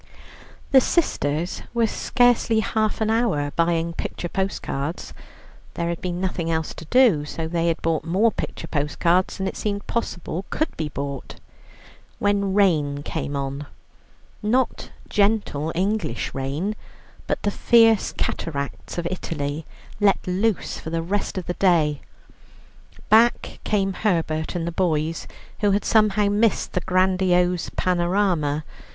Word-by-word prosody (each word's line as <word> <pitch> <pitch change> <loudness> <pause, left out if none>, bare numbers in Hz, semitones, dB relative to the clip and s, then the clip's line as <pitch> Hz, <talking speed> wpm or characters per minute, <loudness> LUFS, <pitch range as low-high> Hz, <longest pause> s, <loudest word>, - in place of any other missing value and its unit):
The 265 -2 +7
sisters 165 - 0
were 235 -1 +3
scarcely 240 -1 +2
half 215 +1 -1
an 220 0 +2
hour 220 -12 +1
buying 170 0 +1
picture 175 - -4
postcards 170 -5 -3 0.6
(there 170 0 -1
had 170 - -3
been 175 -1 -3
nothing 180 -3 -2
else 160 -1 -1
to 165 - -10
do, 225 - +4
so 160 +2 -4
they 170 0 0
had 165 - +1
bought 165 -1 +1
more 200 +7 +2
picture 165 - -5
postcards 165 +4 +1
than 190 -1 -2
it - - -4
seemed 200 -1 -3
possible 185 -5 -3
could 310 - -1
be 155 -2 -3
bought), 140 -2 -5 0.8
when 200 -1 +1
rain 150 -8 +2
came 145 - -3
on 140 +1 -4 0.7
not 245 +4 0 0.2
gentle 200 -8 +1
English 190 -1 -1
rain, 145 +10 -2 0.5
but - - 0
the 205 - +1
fierce 225 0 +4
cataracts 140 -1 -4
of 170 -1 -1
Italy, 155 -4 -4 0.3
let 205 -2 +3
loose 195 +3 0
for - - -6
the 165 0 -1
rest 195 +3 -2
of 185 - -3
the 175 - -2
day. 160 -6 +2 1.1
Back 230 +3 +4
came 195 -2 +1
Herbert 165 -6 -1
and 170 -2 -1
the 170 - -2
boys, 165 -2 -1 0.3
who 205 - +3
had 200 +1 +1
somehow 210 -2 +3
missed 210 +1 +1
the 180 - 0
grandiose 180 -1 +2
panorama. 175 -4 +1
180 Hz, 135 wpm, -23 LUFS, 160-205 Hz, 1.1 s, The